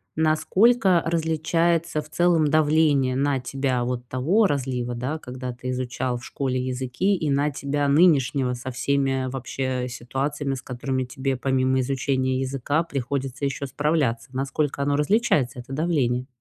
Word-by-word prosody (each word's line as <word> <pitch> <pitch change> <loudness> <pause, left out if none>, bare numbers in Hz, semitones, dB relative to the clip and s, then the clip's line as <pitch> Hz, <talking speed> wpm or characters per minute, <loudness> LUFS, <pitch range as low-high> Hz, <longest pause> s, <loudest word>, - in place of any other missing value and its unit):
насколько 185 +5 +3
различается 165 0 +1
в 150 - -15
целом 170 -1 +3
давление 150 -3 +3
на 140 0 +1
тебя 130 0 -1
вот 125 0 -3
того 165 - +2
разлива, 125 -5 -2
да, 130 +6 -3
когда 125 -3 -6
ты 125 +1 -7
изучал 125 0 -2
в 120 - -10
школе 130 -2 -2
языки, 130 +9 0
и 160 -5 -2
на 140 +2 +2
тебя 145 +1 -1
нынешнего 140 -4 +3
со 125 +1 -6
всеми 135 0 0
вообще 130 -1 -3
ситуациями, 135 +3 -3
с 130 - -7
которыми 130 +1 -3
тебе, 130 +1 -2
помимо 130 0 +1
изучения 130 0 0
языка, 135 +4 0
приходится 140 -2 -3
ещё 140 0 -2
справляться. 140 -5 0
Насколько 140 +2 -1
оно 140 0 +1
различается, 150 - +1
это 125 +2 -10
давление? 135 -5 0
135 Hz, 145 wpm, -24 LUFS, 130-150 Hz, -, насколько